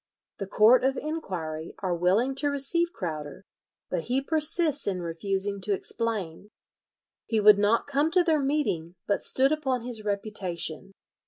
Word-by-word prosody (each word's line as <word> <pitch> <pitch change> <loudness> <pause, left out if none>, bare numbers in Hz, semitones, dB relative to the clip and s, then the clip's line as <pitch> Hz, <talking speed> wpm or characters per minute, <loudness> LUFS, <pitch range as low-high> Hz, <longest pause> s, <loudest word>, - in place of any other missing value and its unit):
The 195 - -4
Court 220 +6 +5
of 270 +1 +1
Enquiry 175 - -5
are 185 -3 -2
willing 190 +10 +1
to 290 +1 +1
receive 335 +5 +1
Crowder, 155 - -6 0.5
but 165 - -2
he 255 +2 0
persists 305 0 +2
in 190 -2 -1
refusing 195 +4 -2
to 205 +2 0
explain. 210 -4 -4 0.8
"He 225 - +1
would 210 -1 +6
not 210 +3 +2
come 285 +2 +1
to 355 +2 +3
their 320 -3 +2
meeting, 270 - -1
but 200 - -1
stood 270 +2 +3
upon 265 -6 -1
his 235 -3 -5
reputation." 195 -4 -3
215 Hz, 150 wpm, -27 LUFS, 185-275 Hz, 0.8 s, would